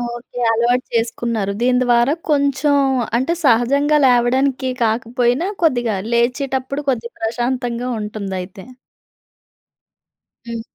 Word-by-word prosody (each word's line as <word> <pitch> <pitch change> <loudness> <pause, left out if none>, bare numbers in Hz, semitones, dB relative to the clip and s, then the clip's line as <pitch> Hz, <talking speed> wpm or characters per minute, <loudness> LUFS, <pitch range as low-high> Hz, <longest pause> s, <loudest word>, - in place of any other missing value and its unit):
Okay. 245 +1 -9
అలవాటు 240 +2 +1
చేసుకున్నారు. 230 -3 -1
దీని 250 +1 +3
ద్వారా 240 +3 +3 0.2
కొంచెం, 285 0 +2 0.4
అంటే 265 +7 0
సహజంగా 280 +5 +3
లేవడానికి 260 +2 +2
కాకపోయినా, 240 +6 0 0.2
కొద్దిగా 240 -8 +1 0.2
లేచేటప్పుడు 260 +3 -1
కొద్దిగా 235 -2 -3
ప్రశాంతంగా 245 +1 -2
ఉంటుందయితే. 195 -3 -6 1.8
హ్మ్. 230 -1 -4
245 Hz, 90 wpm, -19 LUFS, 235-265 Hz, 1.8 s, దీని